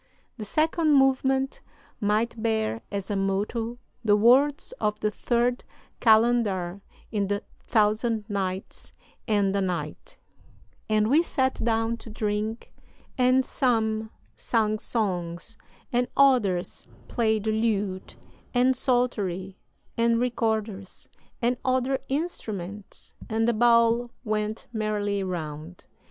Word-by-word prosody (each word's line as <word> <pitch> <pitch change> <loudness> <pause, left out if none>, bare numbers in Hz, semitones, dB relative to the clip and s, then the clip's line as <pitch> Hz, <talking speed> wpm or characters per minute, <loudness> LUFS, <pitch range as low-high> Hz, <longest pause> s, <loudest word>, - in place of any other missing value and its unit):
"The 215 - -5
second 310 +4 +2
movement 270 0 +2 0.4
might 215 +2 0
bear 220 0 0
as 200 -1 -4
a - - 0
motto 210 +5 -1 0.3
the 210 -2 +4
words 265 - +4
of 210 0 0
the 210 - 0
Third 240 +3 0 0.4
Kalandar 220 -5 +3 0.3
in 205 -3 0
the 205 0 -2 0.2
Thousand 215 0 +1
Nights 195 -2 -4 0.3
and 200 -3 +2
a 200 - +1
Night: 170 -5 -4 0.7
'And 215 0 +3
we 290 +7 +5
sat 260 -6 0
down 225 0 +1
to 230 - -12
drink, 215 +1 -3 0.4
and 255 0 +3
some 220 -4 0 0.3
sang 215 -2 0
songs 185 -2 -3 0.4
and 245 +1 +2
others 225 -10 +2 0.2
played 220 -3 +1
the 220 - 0
lute 210 -4 -1 0.4
and 255 +1 +4
psaltery 205 -8 -1 0.4
and 230 0 +3
recorders 220 -5 -2 0.3
and 245 +1 +2
other 260 +1 +1
instruments, 210 - -5 0.2
and 225 +1 +1
the 235 - +3
bowl 235 +1 +4
went 215 -1 -2
merrily 210 -2 -1
round. 165 -2 -6
220 Hz, 115 wpm, -26 LUFS, 205-240 Hz, 0.7 s, we